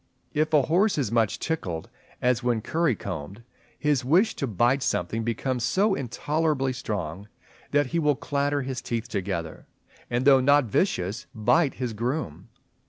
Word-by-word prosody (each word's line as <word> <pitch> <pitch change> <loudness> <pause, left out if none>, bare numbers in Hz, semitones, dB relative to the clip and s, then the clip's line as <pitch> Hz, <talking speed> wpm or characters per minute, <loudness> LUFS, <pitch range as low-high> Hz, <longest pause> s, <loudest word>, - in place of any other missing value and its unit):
If 155 +1 +1
a 150 -3 +5
horse 185 - +2
is 130 -8 0
much 115 -3 +2
tickled, 90 - -3 0.4
as 125 0 +2
when 120 -3 0
curry 160 0 +1
combed, 95 +3 -7 0.3
his 150 -4 +1
wish 180 - +3
to 140 - -1
bite 120 +5 +2
something 115 -3 -1
becomes 120 +2 -2
so 195 - +2
intolerably 145 - -1
strong, 100 -6 -4 0.4
that 145 0 +3
he 170 - +2
will 150 -2 +2
clatter 145 +1 -1
his 130 -1 -4
teeth 115 0 -3
together, 90 -7 -4 0.4
and 120 +2 0
though 135 -2 +7
not 145 +1 +4
vicious, 105 - -1
bite 135 +7 +2
his 125 -3 -3
groom. 110 - -3
125 Hz, 155 wpm, -26 LUFS, 110-145 Hz, 0.4 s, though